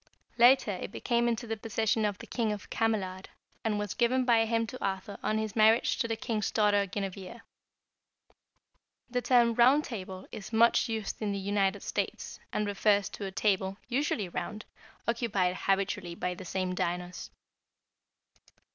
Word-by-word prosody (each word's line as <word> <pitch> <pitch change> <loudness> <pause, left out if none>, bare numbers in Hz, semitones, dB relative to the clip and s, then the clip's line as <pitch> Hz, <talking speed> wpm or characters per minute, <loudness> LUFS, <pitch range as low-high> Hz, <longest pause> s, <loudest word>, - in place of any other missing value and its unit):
Later 245 -2 +6
it 190 +1 -6
came 240 -1 +2
into 235 0 -1
the 225 -1 -2
possession 220 0 0
of 205 -2 -1
the - - -10
King 225 -3 -1
of 210 -1 -6
Camelard, 195 -4 -1 0.3
and 220 -2 0
was 205 -2 -3
given 255 +2 +2
by 230 -2 +4
him 230 0 +1
to 255 +3 -8
Arthur 195 +1 -3
on 215 +1 0
his 220 -1 -3
marriage 220 +1 +4
to 230 - +1
the 225 - -1
king's 220 -2 -2
daughter 205 -2 +2
Guinevere. 195 +3 -5 1.7
The 245 0 0
term 240 -2 +4
Round 255 +6 +5
Table 190 -7 -7
is 200 - -8
much 230 +1 +4
used 220 -2 -3
in 205 -2 -1
the - - -2
United 195 0 0
States, - - -3
and 210 - -1
refers 205 0 +2
to 205 - -6
a 195 - -4
table, 190 -1 0
usually 245 -6 0
round, 210 +4 -5 0.4
occupied 205 -6 +1
habitually 195 -2 -1
by 180 +1 -2
the 180 +1 -9
same 185 +1 -2
diners. 180 0 -3
210 Hz, 160 wpm, -30 LUFS, 195-230 Hz, 1.7 s, Later